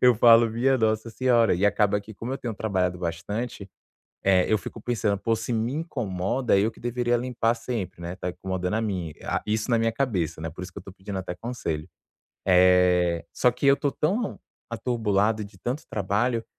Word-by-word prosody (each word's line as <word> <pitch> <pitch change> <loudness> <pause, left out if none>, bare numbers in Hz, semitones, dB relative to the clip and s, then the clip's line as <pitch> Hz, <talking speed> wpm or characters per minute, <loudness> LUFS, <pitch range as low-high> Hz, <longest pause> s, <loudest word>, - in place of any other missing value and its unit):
eu 125 -1 +6
falo: 115 +1 +7
"Minha 130 +4 +2
Nossa 110 +1 0
Senhora", 120 -3 +3
e 95 +4 +2
acaba 105 0 +2
que, 105 +1 -12
como 120 +6 -5
eu 135 - -3
tenho 120 -3 -4
trabalhado 95 -4 0
bastante, 100 +5 -4 0.5
eh, 95 -2 +4
eu 110 - +5
fico 105 +3 -7
pensando: 110 -4 0
"Pô, 115 +3 +1
se 110 +2 -4
me 115 +2 0
incomoda, 125 - -1
eu 105 +3 +2
que 110 - -20
deveria 120 0 0
limpar 120 -1 0
sempre, 115 -7 -5
né, 85 +1 -5
tá 90 - -4
incomodando 95 +1 -3
a - - +1
mim", 95 -7 -3
ah, - - -1
isso 110 +2 -1
na 115 - +4
minha 115 0 +1
cabeça, 100 - -1
né, 80 - -3
por 80 +3 -8
isso 90 0 -8
que 100 - -7
eu - - -11
tô 95 - -11
pedindo 95 +1 -6
até 95 -1 -5
conselho. 90 -7 -4 0.6
Eh, 90 -2 +4
só 125 - +3
que 125 +4 -2
eu 140 0 +6
tô 145 -1 -1
tão 200 +8 -1 0.3
atrobulado 110 -3 0
de 100 -1 -14
tanto 125 - -3
trabalho 110 +4 0
110 Hz, 200 wpm, -26 LUFS, 95-120 Hz, 0.6 s, falo